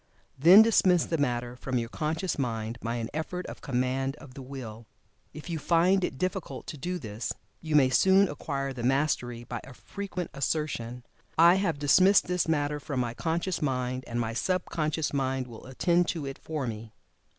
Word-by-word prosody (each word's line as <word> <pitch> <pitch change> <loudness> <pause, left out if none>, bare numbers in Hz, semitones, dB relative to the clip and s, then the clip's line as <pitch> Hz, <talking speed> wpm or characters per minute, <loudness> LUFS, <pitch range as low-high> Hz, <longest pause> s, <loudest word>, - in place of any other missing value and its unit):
Then 175 +10 +8
dismiss 185 -6 +4
the 165 - -2
matter 120 -2 -1
from 130 0 -3
your 115 -1 -1
conscious 155 +6 -2
mind, 115 -2 -2
by 115 +1 -2
an 115 -1 -4
effort 180 +4 -4
of - - -8
command 135 +1 -1
of 145 -3 -14
the 135 - -9
Will. 120 -4 -8 0.4
If 155 +2 -10
you 165 -2 -3
find 175 +5 +3
it 135 - -2
difficult 185 +2 -3
to - - -5
do 180 +5 -2
this, 110 -5 -5 0.3
you 155 -2 -2
may 130 -3 +5
soon 190 +6 +5
acquire 140 -3 -3
the 125 - -6
mastery 125 -2 0
by 120 -1 -6
a 135 - -12
frequent 190 0 -6
assertion, 130 -5 -2 0.3
"I 170 +2 +8
have 165 -6 0
dismissed 185 +7 +5
this 180 -1 0
matter 150 -2 0
from 140 -2 -4
my 120 -2 -1
conscious 170 +6 -2
mind, 130 -2 -1
and 120 0 -3
my 115 -1 -2
sub 185 +10 0
conscious 155 -2 -1
mind 135 -1 0
will 120 0 -11
attend 170 +6 +2
to 160 -5 -2
it 135 0 -6
for 155 -4 -4
me." 110 -1 -6
140 Hz, 185 wpm, -28 LUFS, 125-165 Hz, 0.4 s, Then